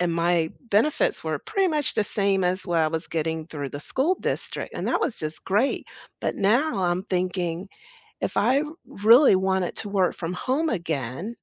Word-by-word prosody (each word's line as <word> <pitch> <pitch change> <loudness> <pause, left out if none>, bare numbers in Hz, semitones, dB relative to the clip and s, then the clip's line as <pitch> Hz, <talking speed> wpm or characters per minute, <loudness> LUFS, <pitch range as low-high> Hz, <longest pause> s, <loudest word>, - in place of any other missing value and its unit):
and 175 -1 +1
my 170 -1 +2 0.2
benefits 305 - +2
were - - -2
pretty 390 -4 0
much 300 -3 0
the - - +2
same 195 -2 +1
as 185 +2 -1
what 170 -2 +2
I 155 - +3
was 160 0 -3
getting 160 0 -2
through 145 -4 -5
the 145 - -6
school 300 - +1
district, - - -3
and - - -3
that - - +1
was 265 - -1
just 155 0 -4
great, 210 +8 +1 0.3
but - - -1
now, 215 +2 +2
I'm 175 +2 0
thinking 180 -1 -2 0.5
if - - -2
I 270 +3 +3 0.2
really 230 +3 +6
wanted 190 -1 0
to 205 - -4
work 190 -3 +2
from 170 0 -4
home 270 - 0
again 160 - -3
190 Hz, 185 wpm, -25 LUFS, 170-230 Hz, 0.5 s, really